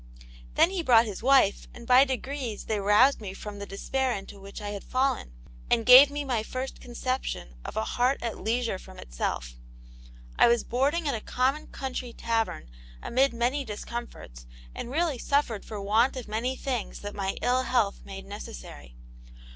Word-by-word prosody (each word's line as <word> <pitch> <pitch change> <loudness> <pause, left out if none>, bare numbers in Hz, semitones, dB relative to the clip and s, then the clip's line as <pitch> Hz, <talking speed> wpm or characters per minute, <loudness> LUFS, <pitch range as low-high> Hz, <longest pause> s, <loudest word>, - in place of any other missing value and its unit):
Then 345 - +5
he 380 -2 -1
brought 240 -6 +5
his 205 -4 -6
wife, 260 -5 +4
and 235 - -10
by 255 +3 +7
degrees 260 -4 -4
they 215 -1 -1
roused 210 +7 +4
me 195 -2 -6
from 205 0 -8
the 200 - -6
despair 260 +6 -1
into 200 0 -9
which 195 0 -9
I 205 -1 -5
had 205 -1 -6
fallen, 260 - 0 0.4
and 230 - +2
gave 255 +3 +10
me 290 0 -4
my 245 -5 0
first 255 +4 -5
conception 245 - -4
of - - -7
a 220 - +1
'heart 250 +4 +1
at 230 -2 -3
leisure 230 -3 -1
from 190 0 -13
itself.' - - -4 0.9
I - - +8
was 235 0 +3
boarding 290 +7 0
at 280 - +1
a 225 - -3
common 265 +7 0
country 255 -2 -5
tavern, 225 - -2 0.3
amid 265 +3 +2
many 245 +4 0
discomforts, 210 - -7 0.3
and - - -6
really 305 -1 0
suffered 280 -7 0
for 215 - -7
want 220 +7 +2
of 250 - -6
many 230 +5 -2
things 255 -5 -4
that 205 0 -6
my 195 -1 -3
ill 250 +1 +3
health 235 -6 0
made 195 0 -9
necessary. 60 - -9
235 Hz, 175 wpm, -27 LUFS, 205-260 Hz, 0.9 s, gave